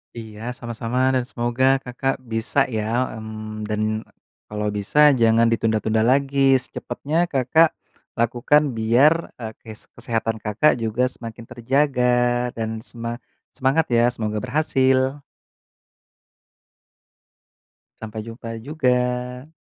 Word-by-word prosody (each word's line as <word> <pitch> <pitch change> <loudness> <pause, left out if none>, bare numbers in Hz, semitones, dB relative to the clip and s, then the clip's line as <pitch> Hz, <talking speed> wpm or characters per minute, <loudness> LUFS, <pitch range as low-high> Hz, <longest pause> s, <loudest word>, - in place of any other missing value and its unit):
Iya, 110 -2 -9
sama-sama, 120 +2 -1
dan 130 - +1
semoga 120 0 -1 0.2
Kakak 135 +2 -2
bisa 115 +4 0
ya. 115 +3 -1
Mmm, 110 -1 -7
dan 105 0 -2 0.7
kalau 105 0 -3
bisa 145 +9 +4
jangan 115 0 +4
ditunda-tunda 110 -1 +1
lagi. 135 0 +3
Secepatnya 160 +5 -2
Kakak 155 +3 +3 0.5
lakukan 125 +5 +2
biar, 120 +8 +5 0.2
eee, 110 -2 -7
kes 110 -1 -12
kesehatan 115 -1 -2
Kakak 110 +6 +2
juga 115 +2 -1
semakin 115 -1 -9
terjaga 125 -1 +1
dan 110 -1 -3
sema 115 +1 -5 0.3
semangat 135 +4 +1
ya, 120 0 +4
semoga 110 -2 -3
berhasil. 130 0 +1 2.8
Sampai 110 0 -6
jumpa 115 0 -7
juga! 125 -2 -1
120 Hz, 105 wpm, -22 LUFS, 110-130 Hz, 2.8 s, biar